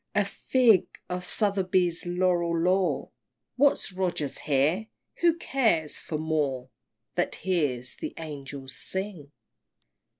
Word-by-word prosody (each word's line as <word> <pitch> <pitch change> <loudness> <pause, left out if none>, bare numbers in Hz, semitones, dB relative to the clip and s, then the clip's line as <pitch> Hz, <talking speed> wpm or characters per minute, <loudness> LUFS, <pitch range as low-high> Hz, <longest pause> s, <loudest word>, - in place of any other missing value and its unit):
A 205 -1 +3
fig 225 +1 +3 0.2
for 180 0 -3
Southey's 185 -3 +1
Laureat 175 -2 +1
lore!" 185 +1 +1 0.4
What's 280 -5 +3
Rogers 180 -6 -1
here? 155 +9 +1 0.3
Who 340 -1 +3
cares 220 - +1
for 155 - -4
Moore 145 -5 -1 0.4
That - - 0
hears 145 -10 -1
the - - -6
Angels 140 -4 -7
sing! 190 -7 -4
175 Hz, 105 wpm, -27 LUFS, 150-195 Hz, 0.4 s, A